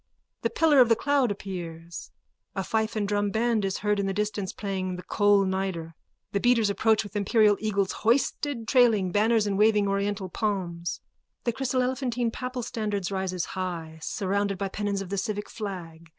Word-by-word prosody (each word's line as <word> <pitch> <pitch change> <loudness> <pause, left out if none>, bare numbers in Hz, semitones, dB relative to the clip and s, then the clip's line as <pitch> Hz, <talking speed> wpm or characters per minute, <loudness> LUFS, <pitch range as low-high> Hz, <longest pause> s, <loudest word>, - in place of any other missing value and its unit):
The - - +1
pillar 310 -4 +4
of 245 -2 +7
the 230 - +6
cloud 280 0 +2
appears. 170 -4 -6 0.5
A 195 - -1
fife 220 +3 -1
and 210 -2 0
drum 205 0 +1
band 225 0 +1
is 195 0 -1
heard 210 0 +2
in 195 - 0
the 195 - -2
distance 205 -2 -2
playing 190 -3 -3
the 180 - -8
Kol 205 0 +3
Nidre. 190 -4 -2 0.4
The 200 - 0
beaters 230 -2 +3
approach 220 +1 +2
with 205 0 -11
imperial 210 +1 +4
eagles 200 -3 0
hoisted, 245 +1 0
trailing 225 -8 +4
banners 215 +2 +3
and 200 -1 -1
waving 210 -1 +4
oriental 200 0 -1
palms. 175 -4 -2 0.4
The 235 - 0
chryselephantine 250 -2 0
papal 250 -1 -4
standard 210 -5 -2
rises 190 -2 -2
high, 170 -4 -4
surrounded 200 +3 -1
by 195 +1 -2
pennons 200 0 -2
of 185 - -10
the 200 0 -1
civic 205 +1 -3
flag. 170 -6 -7
205 Hz, 170 wpm, -27 LUFS, 190-225 Hz, 0.5 s, of